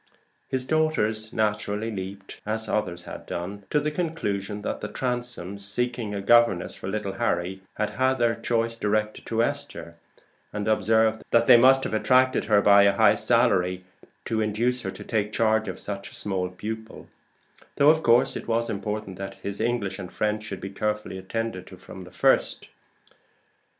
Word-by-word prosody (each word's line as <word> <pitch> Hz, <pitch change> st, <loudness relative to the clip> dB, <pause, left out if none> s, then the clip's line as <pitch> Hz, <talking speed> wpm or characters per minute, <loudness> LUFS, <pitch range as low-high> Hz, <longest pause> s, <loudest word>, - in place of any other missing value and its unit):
His 130 Hz, -1 st, -1 dB
daughters 120 Hz, -9 st, +1 dB
naturally 105 Hz, 0 st, -1 dB
leaped, 95 Hz, 0 st, -7 dB
as 110 Hz, +1 st, -3 dB
others 90 Hz, -6 st, -2 dB
had -, -, -9 dB
done, 100 Hz, +4 st, -5 dB
to 150 Hz, -, +2 dB
the 150 Hz, +1 st, -1 dB
conclusion 105 Hz, -, -3 dB
that -, -, -3 dB
the 105 Hz, -, -3 dB
Transomes, 120 Hz, -6 st, -3 dB
seeking 120 Hz, +2 st, -2 dB
a 100 Hz, -, -3 dB
governess 120 Hz, -4 st, +4 dB
for -, -, -8 dB
little 100 Hz, 0 st, -2 dB
Harry, 95 Hz, 0 st, -1 dB
had 105 Hz, 0 st, -1 dB
had 130 Hz, +1 st, +1 dB
their 120 Hz, -2 st, +2 dB
choice 115 Hz, 0 st, -1 dB
directed 105 Hz, -1 st, -1 dB
to 115 Hz, 0 st, +1 dB
Esther, 140 Hz, -12 st, -4 dB, 0.5 s
and 105 Hz, 0 st, -4 dB
observed 110 Hz, 0 st, +2 dB
that 115 Hz, 0 st, +4 dB
they 125 Hz, -, +8 dB
must 130 Hz, +3 st, +6 dB
have -, -, -3 dB
attracted 130 Hz, +4 st, +3 dB
her 105 Hz, -2 st, +4 dB
by 100 Hz, 0 st, +7 dB
a 100 Hz, 0 st, +5 dB
high 105 Hz, 0 st, +5 dB
salary 100 Hz, -5 st, +2 dB, 0.4 s
to 110 Hz, -1 st, -1 dB
induce 115 Hz, +4 st, 0 dB
her -, -, -4 dB
to -, -, -8 dB
take 105 Hz, -2 st, -1 dB
charge 110 Hz, -1 st, +2 dB
of 95 Hz, -, -5 dB
such 100 Hz, -1 st, -6 dB
a -, -, -12 dB
small 95 Hz, -3 st, -2 dB
pupil; 110 Hz, +4 st, -7 dB, 0.7 s
though 145 Hz, +2 st, +6 dB
of 160 Hz, 0 st, 0 dB
course 120 Hz, -2 st, +4 dB
it -, -, -6 dB
was 115 Hz, 0 st, 0 dB
important 105 Hz, -1 st, -4 dB
that 95 Hz, 0 st, -6 dB
his 100 Hz, +1 st, -4 dB
English 110 Hz, -5 st, -1 dB
and 90 Hz, -2 st, -7 dB
French 105 Hz, 0 st, -1 dB
should 100 Hz, -3 st, -6 dB
be 95 Hz, -, -6 dB
carefully 105 Hz, -1 st, -3 dB
attended 95 Hz, -1 st, -4 dB
to 95 Hz, -, -12 dB
from 95 Hz, 0 st, -11 dB
the 90 Hz, -, -13 dB
first. -, -, +2 dB
110 Hz, 175 wpm, -25 LUFS, 100-115 Hz, 0.7 s, they